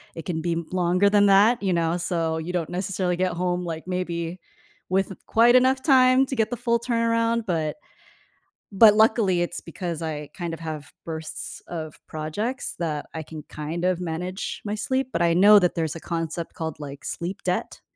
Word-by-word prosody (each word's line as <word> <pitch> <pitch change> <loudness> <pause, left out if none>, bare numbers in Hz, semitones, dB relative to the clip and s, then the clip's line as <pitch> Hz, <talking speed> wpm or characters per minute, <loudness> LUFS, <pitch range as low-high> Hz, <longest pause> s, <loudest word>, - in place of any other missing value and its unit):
it 165 - -7
can 160 -3 -2
be 170 - -1
m 165 -1 -3
longer 180 +2 +3
than 205 0 +4
that, 205 +4 +5
you 190 - +1
know, 170 -1 +1
so 165 -2 -1
you 165 +3 -4
don't 175 -3 -2
necessarily 185 0 -1
get 185 0 0
home, 180 0 -1
like, 165 0 -5
maybe 175 -2 -3 0.5
with 195 +1 +1
quite 235 +2 +5
enough 260 +1 +4
time 260 -1 +5
to 265 - -4
get 220 -2 +1
the 245 - -3
full 235 -1 +1
turnaround, 230 -1 +1
but 160 -3 -1 1.0
but 210 +1 +8
luckily 210 -5 +3
it's 175 - -4
because 170 -1 -5
I 150 -2 -4
kind 175 -2 -4
of 165 - -6
have 155 -4 -6
bursts 160 -1 -6
of 160 -3 -6
projects 205 - -3
that 155 -4 -2
I 160 - -4
can 155 -1 -9
kind 160 +4 -4
of 185 -1 +1
manage 180 +2 -4
my 205 - -2
sleep, 260 +4 -1
but - - 0
I 170 -1 +3
know 205 +3 +8
that 180 -2 +1
there's 160 -2 -1
a - - -6
concept 165 0 -4
called, 160 -2 -5
like, 140 -1 -8
sleep 180 +4 -5
debt. - - -2
180 Hz, 190 wpm, -24 LUFS, 165-210 Hz, 1.0 s, but